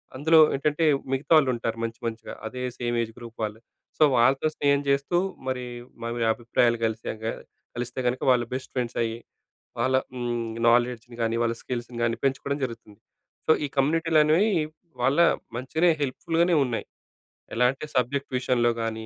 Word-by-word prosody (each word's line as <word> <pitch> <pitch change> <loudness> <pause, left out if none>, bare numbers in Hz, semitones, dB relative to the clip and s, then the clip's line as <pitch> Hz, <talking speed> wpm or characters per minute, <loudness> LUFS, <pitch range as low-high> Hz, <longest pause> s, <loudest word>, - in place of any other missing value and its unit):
అందులో 160 +4 +5 0.2
ఏంటంటే 150 +3 +1 0.3
మిగతా 135 +5 -3
వాళ్ళు 140 -4 +4
ఉంటారు 115 -1 -3
మంచి 115 +1 -4
మంచిగా. 115 -1 -5
అదే 125 +3 -5 0.2
సేమ్ 120 0 -1
ఏజ్ 115 - -7
గ్రూప్ 120 -1 -11
వాళ్ళు. 110 +1 -4 0.4
సో, - - +5
వాళ్ళతో 135 +5 +4
స్నేహం 140 -1 +3
చేస్తూ, 140 +5 +1 0.3
మరి 125 -1 -2 0.4
మావి 115 0 -1
అభిప్రాయాలు 120 0 +1
కలిశాక, 110 0 -4 0.5
కలిస్తే 120 +1 -4
గనక, 125 +1 -1
వాళ్ళు 120 -1 +2
బెస్ట్ 130 0 -4
ఫ్రెండ్స్ 125 -1 -2
అయ్యి, 115 0 -3 0.6
వాళ్ళ 130 +2 +1 0.7
నాలెడ్జ్‌ని 120 0 +1
గానీ, 115 0 0
వాళ్ళ 115 0 +1
స్కిల్స్‌ని 120 -1 -5
గాని, 115 0 0
పెంచుకోవడం 140 +1 0
జరుగుతుంది. 115 -4 -8 0.5
సో, 160 - +6
ఈ - - -1
కమ్యూనిటీలు 160 +3 +3
అనేవి, 170 +8 +3 0.5
వాళ్ళ 135 +4 +2 0.4
మంచిగానే 160 +8 +2
హెల్ప్‌ఫుల్‍గానే 165 +5 +1
ఉన్నాయి. 120 -3 -3 0.7
ఎలా 125 +2 +3
అంటే 140 +3 -8
సబ్జెక్ట్ 130 +3 0
విషయంలో 120 -2 +2
గానీ 110 0 -3
125 Hz, 150 wpm, -26 LUFS, 115-140 Hz, 0.7 s, సో